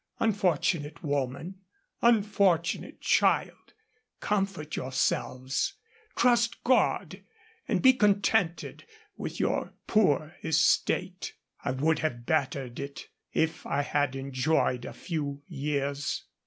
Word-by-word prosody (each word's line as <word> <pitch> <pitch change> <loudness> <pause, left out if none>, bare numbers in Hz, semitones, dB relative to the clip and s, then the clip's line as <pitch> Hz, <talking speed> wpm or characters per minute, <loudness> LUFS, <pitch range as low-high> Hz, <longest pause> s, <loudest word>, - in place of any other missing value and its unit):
Unfortunate 170 -6 0
woman, 145 +5 -2 0.4
unfortunate 200 -7 +2
child, - - +1 0.5
comfort 195 -7 -1
yourselves, 130 - -1 0.4
trust 235 -1 +2
God, 255 0 +1 0.5
and - - 0
be 260 0 +8
contented 205 -5 +1 0.3
with - - -6
your - - -1
poor 160 -6 +2
estate. 160 +3 +1 0.3
I 140 - -1
would 150 +5 +1
have 120 -7 -2
bettered 135 -4 -1
it, 140 0 -7 0.2
if 160 0 0
I 145 +1 0
had 145 -2 0
enjoyed 135 -1 0
a - - -7
few 145 -4 -4
years. 140 -2 -2
155 Hz, 100 wpm, -28 LUFS, 140-195 Hz, 0.5 s, be